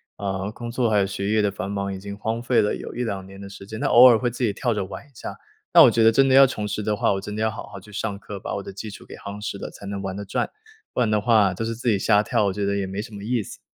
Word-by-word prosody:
呃， 95 -1 -3
工 120 +1 -7
作 120 -1 +1
还 105 - +2
有 100 - +3
学 100 +1 -3
业 110 0 +3
的 100 - +1
繁 100 0 -5
忙 100 -1 -2
已 95 - -6
经 100 +1 -7
荒 110 +3 -2
废 125 0 +3
了 105 - +1
有 - - -8
1-2 105 -6 -3
年 95 0 -12
的 100 0 -8
时 100 0 -11
间， 110 +1 -7
那 - - +1
偶 125 +2 +9
尔 120 - +6
会 120 +2 -1
自 125 - -4
己 110 - +1
跳 120 +3 0
着 105 - -1
玩 95 - -9
一 - - -23
下。 115 - -7 0.4
那 - - +9
我 - - +7
觉 115 - +2
得 110 - +8
真 135 +4 +4
的 - - +4
要 135 0 +8
重 105 -5 -4
拾 105 +1 -3
的 105 0 0
话， - - +1
我 95 - -2
真 105 +1 -6
的 110 - -3
要 110 0 +1
好 110 - -8
好 100 - -10
去 105 - -15
上 105 0 -3
课， 100 0 -8
把 - - -4
我 100 - -4
的 - - -8
基 100 +3 -7
础 100 - -11
给 - - -12
夯 100 +1 -8
实 100 - -3
了 - - -6
才 - - -12
能 100 0 -4
玩 95 -1 -4
得 100 - -5
转， 95 - -2 0.4
不 - - 0
然 115 -3 +2
的 105 - +3
话 105 -4 +4
都 105 +5 -3
是 115 0 -3
自 120 +1 -1
己 105 -3 +2
瞎 105 +1 +3
跳， 105 - +1
我 100 - 0
觉 100 +1 -2
得 100 0 0
也 100 -1 -2
没 95 +2 -4
什 110 0 -10
么 100 - -8
意 120 -1 0
思。 - - -11
105 Hz, 365 characters per minute, -23 LUFS, 100-115 Hz, 0.4 s, 偶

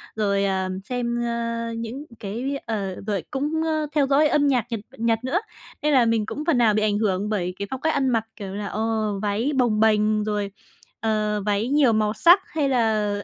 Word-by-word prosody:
Rồi, 200 -2 +1
à, 190 -1 0
xem, 240 0 -2
ơ, 230 0 -2
những 235 +6 -5
cái 245 +8 -3
ờ, 200 -4 -3
rồi 200 -3 -1
cũng, 300 +3 -1
ơ, 310 -1 0
theo 280 -2 +3
dõi 290 +2 +4
âm 290 -1 +2
nhạc 250 -4 +2
Nhật 225 - -1 0.2
Nhật 225 0 +1
nữa. 280 +9 +1 0.4
Nên 300 0 +2
là 250 -3 +5
mình 225 -2 +1
cũng 300 +6 -5
phần 305 -7 +3
nào 225 -3 +4
bị 215 - +1
ảnh 210 -1 +1
hưởng 205 -1 0
bởi 180 -4 -1
cái 200 - -3
phong 265 0 -4
cách 320 0 +1
ăn 270 -2 +1
mặc, 225 -2 +1
kiểu 195 -2 -7
là, 205 0 -4
ờ, 215 - -3 0.4
váy 215 +7 0
bồng 230 -4 +2
bềnh 215 -1 +3
rồi, 205 -2 -2 0.5
ờ, 215 -2 0
váy 210 +3 +1
nhiều 280 -5 +4
màu 215 0 +1
sắc 345 - +6
hay 290 -4 -1
là, 220 -4 +2
225 Hz, 210 wpm, -23 LUFS, 210-265 Hz, 0.5 s, sắc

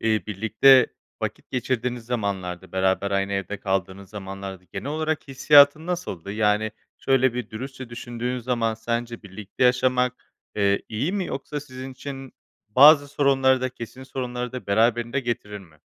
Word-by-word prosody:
eee, 110 -1 +1
birlikte 110 +6 +5 0.4
vakit - - -5
geçirdiğiniz 125 -1 -2
zamanlarda, 95 -6 -3
beraber 95 +1 +1
aynı 100 0 0
evde 100 +1 -3
kaldığınız 95 0 -3
zamanlarda 95 -2 -7
genel 95 - -5
olarak 155 -1 -2
hissiyatın 145 +3 +5
nasıldı? 100 - -4
Yani, 105 0 +1 0.3
şöyle 130 -2 +2
bir 125 -3 -4
dürüstçe 130 +3 -7
düşündüğün 120 +1 -4
zaman, 120 -2 -1
sence 115 +1 -4
birlikte 100 +4 -4
yaşamak, 125 0 +1 0.2
eee, 100 -1 +2
iyi 130 - -2
mi 195 -3 -1
yoksa 145 +2 -5
sizin 130 -2 -9
için 135 0 -8 0.4
bazı 145 +5 +7
sorunları 135 -2 +3
da, 130 - 0
kesin 130 +1 -9
sorunları 125 -2 -4
da 125 - -7
beraberinde 115 +5 +2
getirir 110 -4 -4
mi? 80 -5 -18
120 Hz, 145 wpm, -24 LUFS, 100-130 Hz, 0.4 s, bazı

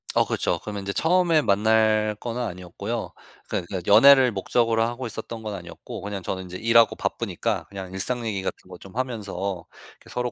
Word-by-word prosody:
어 - - +3
그렇죠. - - -1
그러면 105 -1 -5
이제 100 - -2
처음에 170 - +3
만날 110 -1 +3
거는 120 +1 -4
아니었고요. 100 +2 -5 0.4
그 - - -1
그 95 -2 -3
연애를 135 -2 +8
목적으로 115 +3 +1
하고 120 +2 -3
있었던 110 +1 -6
건 105 -1 -4
아니었고 85 -2 -9
그냥 100 0 -5
저는 95 0 -4
이제 90 0 -9
일하고 115 +2 +4
바쁘니까 - - -2
그냥 95 -2 -8
일상 120 +5 -1
얘기 100 -3 -2
같은 95 - -5
거 90 - -9
좀 95 +2 -14
하면서 100 -8 -3 0.4
이렇게 - - -17
서로 125 0 -2
110 Hz, 415 characters per minute, -24 LUFS, 95-120 Hz, 0.4 s, 연애를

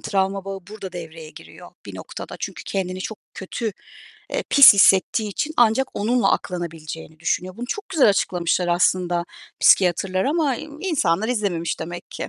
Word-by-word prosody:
travma 195 0 -1
bağı 195 0 -5
burada 200 -4 -8
devreye 165 -2 -9
giriyor - - -14 0.2
bir - - -9
noktada. - - -8
Çünkü - - -6
kendini 185 -1 -3
çok 215 +2 -6 0.2
kötü, 210 +3 -4 0.6
eee, - - -2
pis 280 -6 +9
hissettiği 200 +2 +4
için 305 +10 -3
ancak 240 +2 +3
onunla 235 +4 +1
aklanabileceğini 160 -3 -5
düşünüyor. 180 +2 -2
Bunu 240 +1 -6
çok 410 +10 -5
güzel 280 -8 +4
açıklamışlar 180 -2 0
aslında 175 0 +1 0.4
psikiyatrlar 185 +1 +3
ama 290 -3 +1 0.2
insanlar 220 - 0
izlememiş 195 -9 -2
demek 175 +2 -7
ki. - - -6
190 Hz, 145 wpm, -22 LUFS, 175-225 Hz, 0.6 s, pis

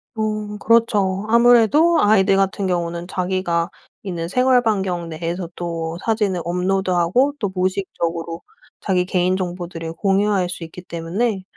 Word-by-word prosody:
어 215 -1 -3
그렇죠. 210 -4 +2
아무래도 245 +8 +5
아이들 195 -2 +4
같은 195 0 0
경우는 170 -1 -2
자기가 180 -2 -1 0.3
있는 175 -4 -4
생활 250 +5 +3
반경 190 -6 -1
내에서 170 +2 -4
또 165 -1 -4
사진을 210 -5 0
업로드하고 185 +7 +1
또 205 -3 -1
무의식적으로 170 -3 -2 0.4
자기 185 -3 0
개인정보들을 180 -2 -2
공유할 195 0 +1
수 175 - -6
있기 165 +2 -10
때문에 185 +5 -2
185 Hz, 315 characters per minute, -20 LUFS, 175-210 Hz, 0.4 s, 아무래도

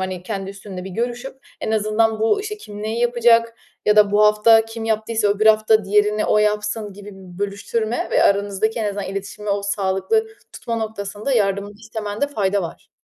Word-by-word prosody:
hani, 185 -1 -4
kendi 195 0 -5
üstünle 195 -2 -9
bir 190 - -7
görüşüp 245 +6 -5
en - - -3
azından 220 +1 +1
bu, 225 - +2
işte, 425 +1 -5
"Kim 210 - -10
neyi 220 +2 -2
yapacak? 235 -1 +3 0.3
Ya 210 0 +4
da 210 -1 +6
bu 210 +1 +4
hafta 215 +1 +5
kim 225 0 -7
yaptıysa 220 -1 0
öbür 205 +2 +1
hafta 215 0 +4
diğerini 210 +1 +2
o - - +3
yapsın." 210 0 -1
gibi 205 +1 -11
bir 185 -2 -13
bölüştürme 215 +3 -2
ve - - +3
aranızdaki 200 +2 +1
en 220 - -1
azından 205 -1 -3
iletişimi 200 +2 -6
o 200 0 0
sağlıklı 200 - 0 0.3
tutma 230 - -4
noktasında 215 +2 -4
yardımını 200 -3 0
istemende 220 +2 -3
fayda 200 -6 0
var. 170 - -8
210 Hz, 180 wpm, -21 LUFS, 200-225 Hz, 0.3 s, da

